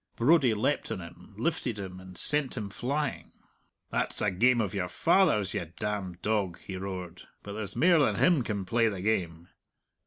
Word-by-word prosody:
Brodie 130 -2 +4
leapt 125 +7 -1
on - - -3
him, 90 +4 -12
lifted 125 -4 -1
him, 95 -2 -7
and 95 -1 -12
sent 145 -3 +3
him 105 -3 -4
flying. 140 +6 -3 0.6
"That's - - 0
a 105 - +1
game 120 +6 +3
of 105 -5 -1
your 95 -3 -1
father's, 155 - +2
you 85 -6 -4
damned 95 -4 -4
dog," 105 -5 0
he 95 - -7
roared. 95 -2 -6 0.2
"But 100 - -7
there's 105 -2 -5
mair 175 0 +5
than 145 - +3
him 175 -6 +4
can 100 -4 -3
play 115 +3 +2
the 95 -3 -5
game!" 85 -6 -1
105 Hz, 180 wpm, -29 LUFS, 95-125 Hz, 0.6 s, mair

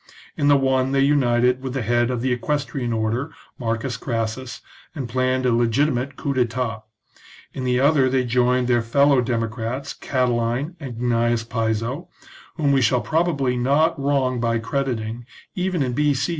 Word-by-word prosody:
In 145 - 0
the 145 -1 +6
one 130 0 +1
they 135 - +2
united 125 -3 +3
with 130 -1 -5
the 135 - -1
head 120 +2 +1
of 125 -2 -2
the 130 +1 0
equestrian 135 -1 -2
order, 115 +6 -1 0.3
Marcus 115 0 -2
Crassus, 115 +1 -4 0.3
and 135 -5 -4
planned 130 +2 0
a 125 - +3
legitimate 125 +3 +1
coup 140 0 -2
d'etat; 120 -3 -1 0.7
in 130 - -4
the 125 0 +2
other 140 -1 +4
they 130 0 +1
joined 125 +1 +2
their 120 -1 +3
fellow 140 +3 +3
democrats 115 +3 -3
Catiline 125 +4 -1
and 135 -6 -7
Gnaeus 120 -1 0
Piso, 115 +7 -2 0.5
whom 145 -4 +1
we 135 -1 +3
shall 125 +1 +2
probably 155 -6 0
not 145 +6 +2
wrong 135 -3 +1
by 115 -1 +1
crediting, 115 -1 -3 0.3
even 180 -4 -1
in 125 -2 -2
B.C. 145 0 +1
125 Hz, 155 wpm, -22 LUFS, 120-140 Hz, 0.7 s, the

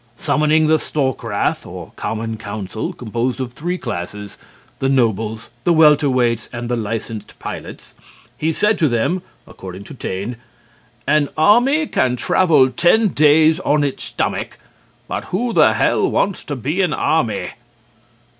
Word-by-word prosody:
Summoning 155 +3 +2
the 155 0 +3
Storkrath, 130 -9 -1
or - - -9
common 110 0 -3
council 105 0 -5
(composed 120 +2 -3
of 125 -2 -4
three 175 +7 -3
classes: 105 - -6 0.4
the 135 - 0
nobles, 115 -4 0
the 170 - +3
welterweights, 135 -7 +3
and 120 -1 -5
the 120 - +1
licensed 110 -1 -5
pilots) - - -8 0.4
he 160 +1 -1
said 210 +6 +1
to 160 - +4
them: 135 +9 0 0.2
(according 95 +1 -10
to - - -11
Taine) 105 0 -5 0.7
"An 150 -1 +2
army 245 - +4
can 125 - +1
travel 145 0 +3
ten 210 +8 +3
days 155 0 +4
on 150 0 +1
its 140 -2 -2
stomach, - - -3 0.5
but - - -4
who 235 +5 -2
the - - +5
hell - - +2
wants 200 -2 0
to 145 - -4
be 145 +9 -1
an 175 -5 +1
army?" 155 -9 0
135 Hz, 140 wpm, -19 LUFS, 115-160 Hz, 0.7 s, the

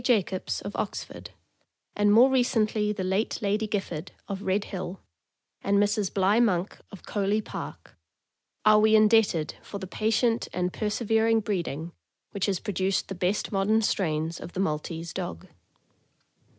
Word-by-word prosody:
Jacobs, 200 -7 0
of - - -6
Ox - - -2
ford, - - -11 0.7
and 205 0 +3
more 245 +5 +7
recently 220 -4 +2
the 205 -3 -3
late 190 +4 0
Lady 215 0 0
Gifford, 185 -5 -3 0.2
of 200 -1 -4
Red 200 0 0
Hill, 185 -2 -6 0.6
and 200 0 +2
Mrs. 205 -1 +1
Bligh 200 +3 +3
Monk, 195 -5 +1
of 200 - -12
Coley 205 +1 0
Park, 215 - -8 0.7
are 215 0 +7
we 220 +1 +5
indebted 215 -7 +4
for 200 - -7
the 195 - -6
patient 225 +4 +1
and 180 0 -1
persevering 225 +1 +1
breeding 170 -5 -3 0.4
which 200 0 -1
has 190 -3 0
produced 195 -2 -1
the - - -3
best 185 +3 -1
modern 210 +3 +2
strains 165 -4 -1
of 175 - -9
the - - -4
Maltese 165 -1 -2
dog. 85 0 -5
200 Hz, 150 wpm, -27 LUFS, 185-215 Hz, 0.7 s, more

